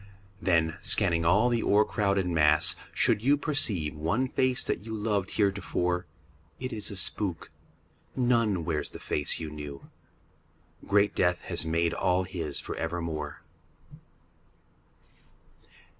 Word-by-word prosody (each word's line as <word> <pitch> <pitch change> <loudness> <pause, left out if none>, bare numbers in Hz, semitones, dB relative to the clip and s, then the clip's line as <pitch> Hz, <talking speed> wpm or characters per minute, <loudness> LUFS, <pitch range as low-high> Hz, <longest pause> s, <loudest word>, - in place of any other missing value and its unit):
Then, 80 -2 +2
scanning 85 -5 +2
all 105 +8 +4
the 120 -1 +1
o'ercrowded 100 -2 +2
mass, 75 -3 +4 0.2
should - - +2
you 140 +5 +3
Perceive 115 - +1
one 100 +13 0
face 130 -1 +1
that 90 - -2
you 110 0 -5
loved 105 -3 -1
heretofore, 95 -4 0 0.5
It 130 -1 -4
is 105 -2 -2
a 100 - -6
spook. 90 -1 -2 0.6
None 115 -8 +2
wears 80 -3 -1
the - - -10
face 75 - -1
you 80 -2 -5
knew. 75 -2 -9 1.0
Great 100 0 +3
death 90 -1 +1
has 80 - -3
made 85 +1 +1
all 90 0 +1
his 85 -6 -3
for - - -5
evermore. 80 -3 -4
90 Hz, 125 wpm, -28 LUFS, 80-105 Hz, 1.0 s, all